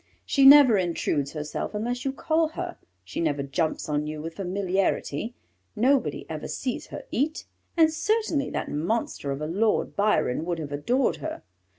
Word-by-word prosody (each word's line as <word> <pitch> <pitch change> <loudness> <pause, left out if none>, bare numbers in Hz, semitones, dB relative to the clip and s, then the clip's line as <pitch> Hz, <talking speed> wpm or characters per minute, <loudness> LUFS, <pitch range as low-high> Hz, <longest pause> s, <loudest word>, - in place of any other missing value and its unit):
She 275 -1 +5
never 275 -7 +9
intrudes 160 -5 -1
herself 150 +6 -4
unless 245 +4 -2
you 270 - 0
call 315 +3 +1
her; 355 0 -4 0.3
she 95 - -6
never 145 -4 0
jumps 155 +4 -1
on 150 0 -1
you 155 0 -5
with 165 +2 -6
familiarity; 195 - -1 0.4
nobody 260 +5 +1
ever - - -5
sees 250 -2 -3
her - - -7
eat, 310 +5 -1 0.3
and 320 -1 +5
certainly 380 -7 0
that - - -3
monster 165 -1 -2
of 140 +1 -3
a - - -1
Lord 205 +7 0
Byron 200 -9 +1
would 170 0 -2
have 150 -3 -6
adored 240 - +1
her. - - -6
200 Hz, 165 wpm, -26 LUFS, -, 0.4 s, never